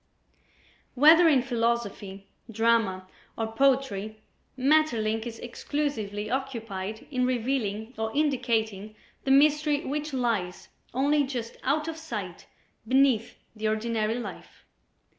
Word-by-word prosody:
Whether 320 +6 +7
in 270 -5 +4
philosophy, 230 -5 -2 0.2
drama 225 -4 +1 0.3
or 225 -1 -2
poetry, 225 -5 +1 0.4
Maeterlinck 245 -6 +2
is 230 -1 -7
exclusively 235 -5 -3
occupied 225 -5 -4
in 255 -2 0
revealing 240 -3 -1
or 220 0 -1
indicating 225 -8 0 0.3
the - - -1
mystery 295 +1 +4
which 300 +2 -3
lies 230 -9 -2 0.2
only 285 +4 +2
just 245 -4 -5
out 300 +4 0
of 325 -1 -4
sight 210 - -6 0.4
beneath 260 -3 +2 0.2
the 215 0 -2
ordinary 220 0 0
life. 245 - -9
235 Hz, 105 wpm, -27 LUFS, 215-275 Hz, 0.4 s, Whether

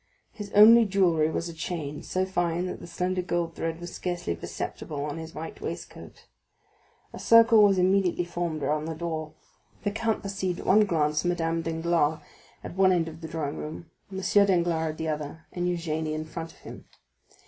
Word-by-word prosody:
His 205 -2 -8
only 225 +3 +9
jewellery 175 -6 +2
was 165 +1 -2
a 170 - -7
chain, 155 -3 -5
so 185 0 -1
fine 175 -2 -1
that 180 - -5
the - - -10
slender 180 +2 -1
gold 175 -2 -2
thread 165 0 -3
was 175 0 -8
scarcely 175 - -3
perceptible 140 - -5
on 150 +2 -4
his 160 0 -9
white 160 +1 -7
waistcoat. - - -8 0.9
A - - -8
circle 230 -1 +6
was 200 -2 +5
immediately 185 -1 +2
formed 170 -3 -3
around 150 +1 0
the 160 0 -4
door. 160 -1 -4 0.5
The 205 - 0
count 225 +1 -1
perceived 195 -3 -3
at - - -8
one 210 +2 +5
glance 150 -4 +1
Madame 165 -2 0
Danglars 165 -1 0 0.4
at - - -7
one 190 0 +5
end 170 -3 +1
of 160 +1 -12
the 160 - -6
drawing 155 -3 -4
room, 155 +1 -7 0.2
M. 190 - -4
Danglars 175 -6 +2
at - - -15
the 160 - -3
other, 155 +1 -4
and 175 0 -2
Eugénie 160 -3 -2
in 155 0 -4
front 160 +1 -7
of - - -22
him. - - -10
170 Hz, 185 wpm, -27 LUFS, 160-185 Hz, 0.9 s, only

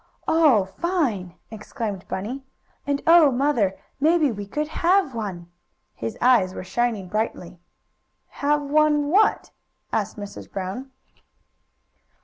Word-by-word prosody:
"Oh, 295 -12 +4
fine!" 220 - -2 0.2
exclaimed 210 -2 -6
Bunny. 245 +8 -5 0.4
"And 285 0 -1
oh, 330 -3 +7
Mother! 245 -7 +1 0.2
Maybe 310 -1 +3
we 205 -2 -6
could 300 +8 -2
have 340 -1 +1
one!" 185 -6 -6 0.4
His 115 0 -5
eyes 230 -7 +3
were - - -6
shining 215 0 -1
brightly. 180 -4 -3 0.7
"Have 290 +1 0
one 295 0 +2
what?" 410 +6 +2 0.4
asked 215 0 -1
Mrs. 205 -1 -9
Brown. 195 +8 -5
240 Hz, 115 wpm, -23 LUFS, 195-295 Hz, 0.7 s, oh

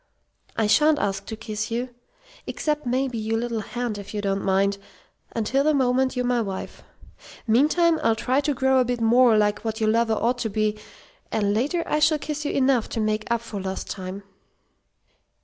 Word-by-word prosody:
"I 220 - +2
sha'n't 300 +8 +4
ask 195 -3 -2
to 220 - -5
kiss 215 -1 -5
you 240 +2 -2 0.6
except 300 -3 -2
maybe 255 -1 -1
your 220 +1 -1
little 235 -1 -2
hand 235 -1 -4
if 200 +1 -9
you 205 - -1
don't 195 0 -1
mind 195 +1 +1 0.6
until 235 +5 +1
the 305 0 +3
moment 260 0 +1
you're 250 0 -1
my 245 -1 +1
wife. 195 -3 -6 0.6
Meantime, 310 +8 +3
I'll 225 -1 +2
try 255 +5 +1
to 290 -1 -1
grow 265 0 +3
a - - +4
bit 245 0 -2
more 230 0 +5
like 210 -1 +2
what 220 0 -4
your 215 -1 +2
lover 230 0 +2
ought 245 +3 0
to 225 - -1
be; 215 0 0 0.6
and 205 -2 +1
later 290 +10 0
I 300 - 0
shall 310 0 +4
kiss 300 0 -5
you - - 0
enough 260 -4 +2
to - - -3
make 215 0 -1
up 235 -1 +1
for 220 -4 -6
lost 190 0 -5
time." 190 +1 -6
230 Hz, 190 wpm, -24 LUFS, 215-260 Hz, 0.6 s, more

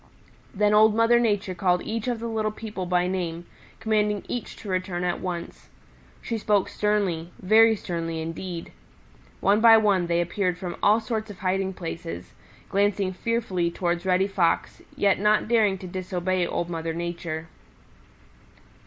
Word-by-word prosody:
Then 210 +1 +2
Old 215 0 +6
Mother 230 +1 +4
Nature 205 -5 0
called 180 -1 +1
each 225 +1 -3
of 245 -2 0
the 235 - -4
little 220 -1 -1
people 210 -4 -6
by 180 0 +2
name, 175 -2 -3 0.3
commanding 210 -2 0
each 245 - -5
to - - -11
return 185 -1 -2
at 175 -1 -1
once. 175 -2 -6 0.5
She 230 -1 -3
spoke 205 -2 +1
sternly, 195 -6 0
very 220 +3 +5
sternly 165 -4 -4
indeed. 165 +1 -6 0.7
One 205 +2 +3
by 225 -1 +8
one 200 -5 +2
they 170 0 +1
appeared 180 +1 -1
from 180 -1 -5
all 210 +2 +5
sorts 220 -1 -3
of 205 - -9
hiding 190 +1 -1
places, 165 - -6 0.3
glancing 200 -1 +1
fearfully 185 -4 -1
towards 175 0 -2
Reddy 190 0 +2
Fox, 180 -4 0 0.2
yet 200 -2 +3
not 210 +1 +3
daring 215 -4 +3
to 185 - -10
disobey 185 0 -2
Old 170 - -2
Mother 165 -1 -4
Nature. 170 -2 -4
190 Hz, 155 wpm, -25 LUFS, 175-210 Hz, 0.7 s, by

